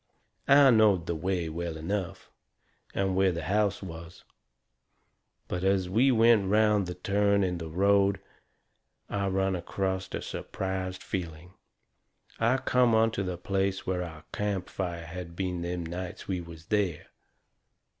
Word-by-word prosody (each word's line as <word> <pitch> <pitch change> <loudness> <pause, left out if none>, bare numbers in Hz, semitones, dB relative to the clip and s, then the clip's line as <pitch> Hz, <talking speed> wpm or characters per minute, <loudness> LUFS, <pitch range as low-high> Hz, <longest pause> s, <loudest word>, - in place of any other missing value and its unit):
I 140 -1 +7
knowed 105 -7 +4
the 85 - -1
way 85 +1 -1
well 85 0 -4
enough, 95 +3 -4 0.6
and 95 -1 0
where 95 0 +3
the 85 -2 -4
house 100 +2 0
was, 85 -2 -9 1.2
but 90 0 -3
as 95 -2 +1
we 125 +7 +4
went 115 -3 +5
around 105 -1 +3
the 90 - -5
turn 100 +2 +2
in 90 -2 -1
the 80 -1 -6
road 100 +3 +3 0.9
I 100 -1 0
run 95 0 +1
acrost 95 +1 -3
a - - -4
surprised 95 -1 -4
feeling. 85 -1 -5 0.9
I 115 +3 +3
come 125 -3 +3
onto 110 -2 +2
the 90 -2 -3
place 95 +1 -1
where 90 -1 -1
our 80 -3 -7
campfire 95 -4 -3
had 85 0 -8
been 90 -1 -2
them 85 0 -3
nights 90 +2 -6
we 90 -2 -2
was 85 -1 -11
there. 100 -7 -1
95 Hz, 140 wpm, -28 LUFS, 85-100 Hz, 1.2 s, I